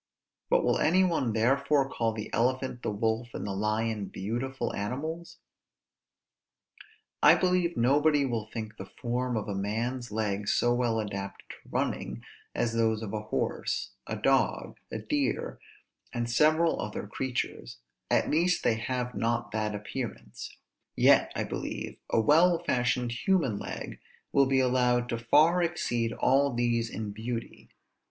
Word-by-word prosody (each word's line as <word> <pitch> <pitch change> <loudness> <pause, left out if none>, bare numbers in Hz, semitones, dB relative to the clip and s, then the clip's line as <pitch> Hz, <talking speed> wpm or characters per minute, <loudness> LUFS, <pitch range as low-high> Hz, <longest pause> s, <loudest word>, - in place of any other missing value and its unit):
but - - +3
will - - +2
any 180 +5 +4
one 165 -10 +1
therefore 135 +5 +2
call 115 -4 -1
the 110 -1 -7
elephant, 130 +1 0
the - - -2
wolf, 110 +3 -1
and - - -4
the 100 - -3
lion, 105 +1 -1
beautiful 120 +8 -3
animals? 155 +11 -4 1.8
I - - +8
believe 180 -2 +1
nobody 145 +4 +3
will 115 -4 -2
think 110 -1 -6
the - - -8
form 125 0 -1
of 105 - -3
a 100 - -2
man's 115 +5 -2
leg 105 -1 -2
so 120 +3 +3
well 120 -2 +1
adapted 100 -2 -5
to - - -11
running, - - -2 0.3
as 115 - 0
those 110 -1 +1
of 100 - -5
a 105 - -2
horse, 105 - -2 0.2
a - - -3
dog, - - +1
a - - -3
deer, 130 +5 -2 0.5
and 120 -1 -2
several 155 +7 +3
other 105 - -4
creatures; 120 - -4 0.3
at - - +2
least 175 +4 +2
they 110 - +2
have 125 +1 -3
not 115 +1 -1
that 105 -1 -1
appearance: 110 +3 -6 0.4
yet, - - +5
I - - 0
believe, - - -5
a - - +3
well 165 +9 +5
fashioned 125 -1 0
human 130 - +1
leg - - -6 0.3
will 140 -1 +4
be 135 0 +3
allowed 125 -1 +2
to 115 - -2
far 155 +9 +4
exceed 120 -9 0
all 140 +2 +2
these 120 -1 0
in 105 -3 -5
beauty. 115 +2 -6
120 Hz, 145 wpm, -29 LUFS, 110-135 Hz, 1.8 s, I